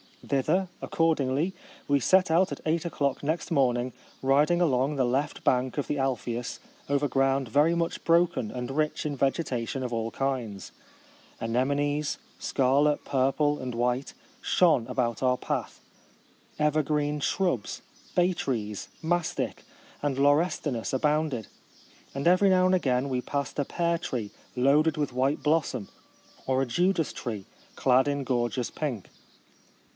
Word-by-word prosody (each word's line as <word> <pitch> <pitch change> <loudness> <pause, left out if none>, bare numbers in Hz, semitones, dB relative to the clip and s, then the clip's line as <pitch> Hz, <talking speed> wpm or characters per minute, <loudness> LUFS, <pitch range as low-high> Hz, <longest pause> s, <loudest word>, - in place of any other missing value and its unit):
Thither, 180 +8 +1
accordingly, 160 +1 +1 0.3
we 140 0 +3
set 185 +5 +3
out 180 +4 +3
at - - -5
eight 160 +2 0
o'clock 140 -5 -1
next 160 +4 -2
morning, 125 -4 +2 0.3
rid 140 +3 +4
ing 175 0 +2
along 140 -2 +2
the 135 - +2
left 135 +4 -1
bank 125 +1 +1
of 145 - -1
the 145 - -1
Alphe 125 -3 -1
us 120 - -6 0.3
over 140 +1 +2
ground 135 -2 +1
very 150 +7 +3
much 170 -1 -2
broken 170 -9 +2
and 125 +2 -5
rich 155 +2 -1
in 145 -2 -2
vegetation 135 -3 -1
of 125 - -3
all 115 0 -1
kinds. 120 -7 -3 0.7
Anemones, 145 +5 0 0.2
scarlet, 140 +3 +2
purple, 140 +2 +1
and 125 -2 -5
white, 125 +3 -1 0.3
shone 155 -10 +3
about 125 -3 -1
our 125 -1 +2
path; - - -4 0.8
evergreen 150 -1 +1
shrubs, 170 - -1 0.3
bay 180 +1 +3
trees, 105 - -3 0.2
mastic, 175 0 -1 0.4
and 145 -2 -1
lau 140 +1 +5
restinus 145 -7 -1
abounded; 150 -4 0 0.7
and 140 - -3
every 185 +3 +5
now 185 -1 +4
and 185 - +3
again 135 -5 +1
we 125 -1 -1
passed 140 +2 -3
a 145 - +1
pear 170 +2 0
tree 120 - -4 0.2
loaded 145 +5 +3
with 145 -4 -1
white 135 +4 0
blossom, 150 -8 0 0.6
or 130 0 +2
a - - +1
judas 170 +6 +1
tree 110 -6 -5 0.3
clad 130 +1 +3
in 140 -1 -1
gorgeous 120 -2 -1
pink. 130 -11 -4
140 Hz, 145 wpm, -27 LUFS, 125-155 Hz, 0.8 s, lau